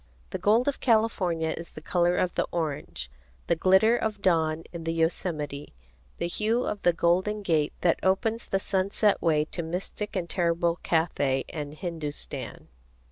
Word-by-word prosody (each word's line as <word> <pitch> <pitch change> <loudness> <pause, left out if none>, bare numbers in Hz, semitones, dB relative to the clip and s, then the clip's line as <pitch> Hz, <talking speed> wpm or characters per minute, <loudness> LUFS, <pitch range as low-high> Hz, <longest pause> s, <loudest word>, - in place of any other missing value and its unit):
The - - -3
gold 225 +5 +3
of 285 - 0
California 190 -9 +2
is 170 - -9
the - - -8
color 175 +1 +1
of 180 - +1
the - - 0
orange, 145 - -3 0.3
the 170 - +2
glitter 190 +7 +5
of 220 -3 -2
dawn 165 -4 +2
in 170 -1 -6
the 165 0 -1
Yosemite, 160 - -2 0.4
the - - -2
hue 220 +7 0
of 205 - -3
the 175 - +4
golden 185 +5 +1
gate 155 -5 +1
that 170 -2 +3
opens 220 +5 +1
the 195 - +1
sunset 195 +2 +1
way 155 -3 +2
to 170 - -5
mystic 180 +5 -4
and 180 -3 -1
terrible 170 -1 +1
Cathay 145 -5 +1
and 150 -2 -5
Hindustan. 160 -4 -6
170 Hz, 160 wpm, -27 LUFS, 160-200 Hz, 0.4 s, glitter